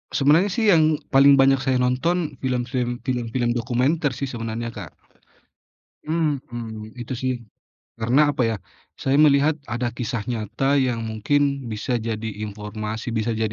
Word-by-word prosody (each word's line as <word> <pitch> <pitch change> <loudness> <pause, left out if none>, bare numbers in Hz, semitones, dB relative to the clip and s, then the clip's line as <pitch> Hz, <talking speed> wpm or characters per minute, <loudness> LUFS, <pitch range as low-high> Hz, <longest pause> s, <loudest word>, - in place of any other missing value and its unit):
Sebenarnya 150 +7 +4
sih 210 +1 +2
yang 155 -3 +4 0.2
paling 140 +1 +7
banyak 135 0 +4
saya 130 0 0
nonton 155 +7 0
film-film 125 -1 -2
film-film 120 -1 -1
dokumenter 125 +5 0
sih 140 - -6
sebenarnya, 115 -1 -4
Kak. - - -8 1.2
Mhm, 120 -9 -3
itu 125 +1 -6
sih. 130 0 0 0.7
Karena 135 +6 +3
apa 130 - 0
ya, 110 - -1 0.4
saya 135 - 0
melihat, 150 +1 +5
ada 120 0 -2
kisah 115 -2 -3
nyata 125 +3 -1
yang 120 -3 0
mungkin 140 +4 0
bisa 110 +3 -2
jadi 110 0 -3 0.2
informasi, 110 +2 -5
bisa 115 +1 -1
jadi 110 -1 -1
125 Hz, 140 wpm, -23 LUFS, 115-140 Hz, 1.2 s, paling